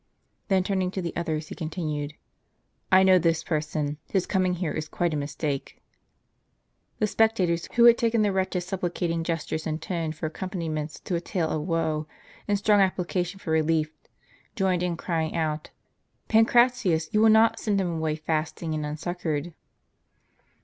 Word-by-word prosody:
Then 190 -2 +3
turning 190 -1 0
to 190 - -2
the 170 - -4
others, 155 -2 -2
he - - -5
continued: 155 -3 -4 0.4
" - - -46 0.3
I 190 0 +7
know 185 -1 +6
this 165 -1 +1
person; 150 -2 -2
his 190 -2 +1
coming 185 -2 +1
here 170 -3 -2
is 155 -1 -4
quite 175 -2 -1
a - - 0
mistake." 145 -1 -3 1.2
The 215 - +2
spectators, 195 -6 +1
who 235 -1 +6
had 235 0 +7
taken 230 -1 +2
the 205 - +2
wretch's 185 -1 -1
supplicating 175 -2 -2
gestures 165 -1 -3
and 155 0 -2
tone 165 -1 -3
for 155 +1 -6
accompaniments 160 -3 -4
to - - -5
a 170 - 0
tale 170 -3 -1
of 155 +2 -2
woe, 160 -3 0 0.4
and 205 -1 +2
strong 205 0 +4
application 180 -1 0
for 165 - -5
relief, 160 -1 +2 0.6
joined 190 -5 +1
in 175 -2 -1
crying 165 -2 -2
out, 155 -2 -2 0.3
" - - -46
Pancratius, 225 -7 +3
you 215 - +4
will 220 - +6
not 220 +1 +5
send 205 -2 0
him 180 -3 -1
away 160 -1 -1
fasting 155 +1 -2
and 155 -1 -2
unsuccored 160 +1 -3
170 Hz, 165 wpm, -26 LUFS, 155-190 Hz, 1.2 s, I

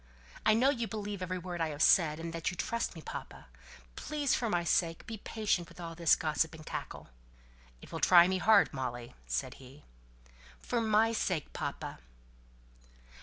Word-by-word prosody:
I 215 - +6
know 260 +5 +4
you 235 -4 -2
believe 205 -3 -5
every 185 0 -3
word 175 -1 -5
I 165 - +1
have 150 0 -1
said, 155 -4 +4
and 165 0 -5
that 165 -1 -2
you 180 - -7
trust 235 -1 -2
me, 160 - -10
papa. - - -8 0.5
Please, 290 -3 -1
for 235 - 0
my 175 -3 +1
sake, 165 0 0
be 225 - -6
patient 205 -6 -1
with - - -16
all 165 -1 -6
this 165 -1 +4
gossip 160 0 -1
and 155 -1 -12
cackle." - - -6 0.7
"It - - -13
will - - -4
try 175 -1 +7
me 185 0 0
hard, 215 +1 +5
Molly," 120 -3 -5
said 60 0 -3
he. 135 +3 -14 0.8
"For 240 -1 -1
my 220 0 +3
sake, 180 -8 -2
papa!" - - -5
175 Hz, 175 wpm, -31 LUFS, 160-215 Hz, 0.8 s, try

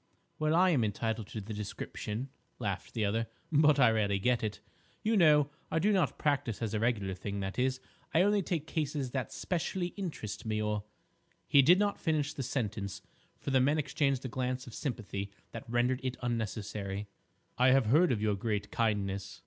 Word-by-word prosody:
"Well, 155 +1 +2
I 185 +1 +5
am 135 -8 +3
entitled 110 0 -2
to 110 - -6
the 110 +2 -6
description," 105 +3 -5 0.3
laughed 100 -2 -4
the 110 -2 +1
other, 115 +3 0 0.2
"but 150 -1 +5
I 125 -4 +6
rarely 105 -3 +1
get 120 +5 +2
it. 105 -1 -2 0.4
You 220 +1 +2
know, 150 -6 +5 0.2
I - - 0
do 200 +6 +3
not 185 -8 +2
practise 140 -7 0
as 115 -2 -2
a 110 - 0
regular 105 -4 0
thing; 100 +2 -4
that 95 +4 -3
is, 130 0 +1 0.3
I 165 - +4
only 205 +1 +3
take 165 -4 -2
cases 145 -5 -2
that 130 -3 -2
specially 180 0 -2
interest 165 - -5
me, 110 -1 -1
or—" 105 -1 -1 0.6
He 140 - +7
did 170 +7 +6
not 205 0 +1
finish 150 -3 0
the - - -4
sentence, 110 -6 -3 0.3
for - - -4
the 130 -1 +4
men 145 +4 +3
exchanged 140 -2 0
a - - 0
glance 125 0 -2
of 120 - -10
sympathy 105 -7 -4 0.2
that 115 0 -8
rendered 120 +2 +2
it 130 -1 -3
unnecessary. 105 -3 -3 0.5
"I 125 - +6
have 130 -1 +5
heard 155 +9 +5
of 110 -3 0
your 105 -1 +2
great 105 0 -2
kindness." 100 -4 -1
125 Hz, 190 wpm, -32 LUFS, 105-145 Hz, 0.6 s, He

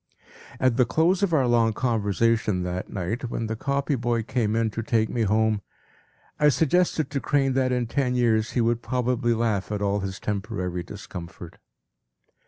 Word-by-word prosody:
p> - - -34 0.3
At 130 -2 +2
the 125 - +5
close 165 - +2
of 200 -3 +1
our 145 -5 +3
long 115 -2 +3
conversation 110 -4 +1
that 90 +1 -4
night, 110 +6 -3
when 115 - -3
the 110 0 -3
copy 140 +5 -1
boy 120 -2 0
came 110 -2 -1
in 115 -1 +1
to 115 - -3
take 110 0 +1
me 120 - -2
home, 110 0 +2 0.8
I 150 - +5
suggested 160 0 +1
to 140 - -1
Crane 135 -1 +1
that 130 -1 +1
in 125 -1 0
ten 125 +1 -1
years 115 -3 +1
he 125 - +1
would 115 +1 +1
probably 125 -2 0
laugh 110 -4 -1
at 105 - -1
all 100 0 0
his 95 0 -5
temporary 100 -4 -3
discomfort. 85 -2 -9
115 Hz, 180 wpm, -25 LUFS, 105-130 Hz, 0.8 s, the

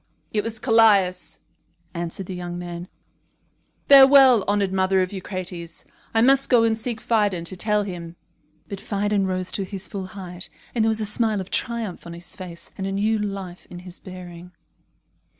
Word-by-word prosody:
"It 210 -1 +1
was 225 0 -3
Callias," 210 -6 +3 0.5
answered 170 +2 -5
the 185 - -6
young 175 -1 -5
man. 175 0 -6 1.0
"Farewell, 270 -4 +8
honoured 200 -2 +1
mother 190 0 +2
of 185 - -5
Eucrates. 180 -3 -6 0.3
I 225 - +5
must 270 +2 +4
go 240 -3 +5
and 225 -1 +2
seek 225 0 -4
Phidon 205 -7 +1
to 185 - -3
tell 210 +2 +1
him." 175 -3 -7 0.5
But 200 -1 -7
Phidon 205 -1 0
rose 185 -1 -2
to 200 - -2
his 190 -1 -7
full 190 +1 -6
height, 180 -2 -8 0.2
and 230 - +1
there 225 - +3
was 220 0 0
a - - 0
smile 215 0 +1
of 190 - -7
triumph 230 -8 -3
on 170 - -7
his 170 +1 -7
face 175 -3 -8
and 190 - -2
a - - -3
new 215 +3 +1
life 195 -3 -5
in 175 - -9
his 180 0 -11
bearing. 180 -1 -10
195 Hz, 175 wpm, -23 LUFS, 180-220 Hz, 1.0 s, Farewell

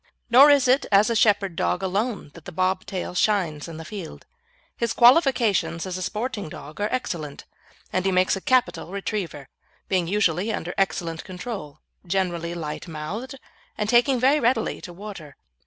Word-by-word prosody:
Nor 270 +5 +9
is 280 -3 +5
it 260 +3 +3
as 205 +3 +5
a - - 0
shepherd 205 -5 +3
dog 180 +2 0
alone 200 - -2
that 170 - -14
the - - -7
bob 185 +2 0
tail 185 -3 -4
shines 180 -6 0
in 165 -1 -8
the 160 - -8
field. 185 -3 -8 0.5
His 235 -1 -1
qualifications 240 - +4
as 185 -1 -4
a 185 - -4
sporting 210 0 -3
dog 155 +5 -9
are 210 - 0
excellent, 160 - -4 0.5
and 185 - +1
he 195 - +1
makes 185 +1 +3
a 195 - -6
capital 255 -7 +1
retriever, 195 - -4 0.4
being 185 -3 +1
usually 195 +1 +1
under 175 -4 -4
excellent 170 -4 -1
control, 185 -4 -7 0.2
generally 175 -2 -2
light 160 +1 -5
mouthed, 185 - -6 0.4
and 210 - -1
taking 245 +3 +4
very 270 +5 +4
readily 235 -2 0
to 175 - -8
water. 180 -5 -9
195 Hz, 170 wpm, -24 LUFS, 170-230 Hz, 0.5 s, Nor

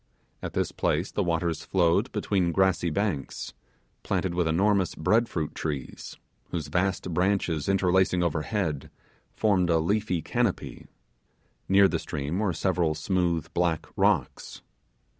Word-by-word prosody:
At - - -5
this - - -1
place 85 +6 -1
the - - -1
waters 85 -2 -1
flowed 85 -3 +2
between 90 -4 0
grassy 95 -1 +2
banks, 80 -5 -3 0.5
planted 95 -2 -1
with 85 -1 +1
enormous 95 +3 +2
bread 110 +9 +2
fruit 80 -3 -3
trees, 70 -5 -5 0.3
whose 80 -5 -4
vast 90 +1 -1
branches 90 -3 0
interlacing 95 -1 +2
overhead, 80 -2 -2 0.5
formed 95 -5 +2
a 85 - +4
leafy 90 0 0
canopy; - - -2 0.8
near 100 +1 +6
the - - -1
stream 75 +5 -3
were 105 -3 +1
several 85 -2 0
smooth 85 -1 -1
black 85 -2 0
rocks. - - 0
90 Hz, 125 wpm, -27 LUFS, 80-95 Hz, 0.8 s, near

